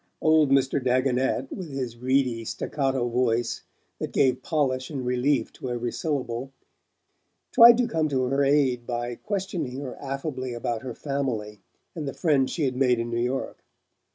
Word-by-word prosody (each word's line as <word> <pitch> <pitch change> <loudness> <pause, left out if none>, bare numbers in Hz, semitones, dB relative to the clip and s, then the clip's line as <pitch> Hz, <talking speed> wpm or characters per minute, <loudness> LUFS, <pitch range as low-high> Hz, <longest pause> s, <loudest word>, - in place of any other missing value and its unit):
Old 155 -2 +4
Mr. 135 0 +2
Dagonet, 130 +1 +1
with 180 -4 -6
his 130 -4 -4
reedy 125 -1 +1
staccato 135 +1 -1
voice, 120 -1 0 0.4
that - - -4
gave 130 -2 +2
polish 130 -5 0
and 135 -4 -4
relief 125 +3 +1
to 130 - -6
every 120 -1 -2
syllable, 135 -4 -3 1.0
tried 235 -1 +9
to 245 -1 +2
come 160 -8 0
to 130 -2 +1
her 135 +2 +1
aid 135 -4 +2
by 120 0 -2
questioning 180 - -4
her 135 -3 -6
affably 135 -2 -4
about 120 -1 -3
her 125 -3 -6
family 120 -8 -3 0.3
and 155 -4 -5
the 135 - -4
friends 140 -6 +2
she 165 - -2
had 130 -2 0
made 125 -2 +3
in 115 0 -3
New 120 0 0
York. 125 +2 -3
130 Hz, 160 wpm, -26 LUFS, 125-140 Hz, 1.0 s, tried